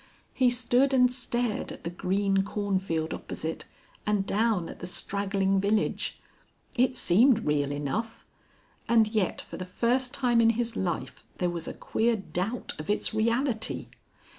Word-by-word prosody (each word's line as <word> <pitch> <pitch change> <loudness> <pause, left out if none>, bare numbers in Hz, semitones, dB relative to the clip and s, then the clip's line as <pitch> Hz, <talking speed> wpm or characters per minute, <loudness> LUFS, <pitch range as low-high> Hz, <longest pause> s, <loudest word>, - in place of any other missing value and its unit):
He 255 -2 +4
stood 250 +2 +2
and 250 -1 +5
stared 245 -2 -2
at - - -10
the 170 - -3
green 195 +2 +1
cornfield 190 -5 -1
opposite, 160 +1 -5 0.4
and 210 -2 +1
down 210 -4 +1
at - - -9
the 175 - -6
straggling 195 +1 0
village. 205 +2 0 0.6
It 255 0 +2
seemed 230 +5 +4
real 145 -1 +1
enough. 150 +11 -3 0.6
And 225 -2 +5
yet 215 -5 0
for - - -9
the 185 - -4
first 245 +7 0
time 245 -3 +2
in 230 0 +5
his 235 -1 -1
life 160 -8 -3
there 180 -1 0
was 170 -1 -4
a - - -4
queer 230 +1 +1
doubt 200 +3 -3
of 155 - -7
its 210 - +1
reality. 230 +2 0
210 Hz, 150 wpm, -28 LUFS, 185-235 Hz, 0.6 s, and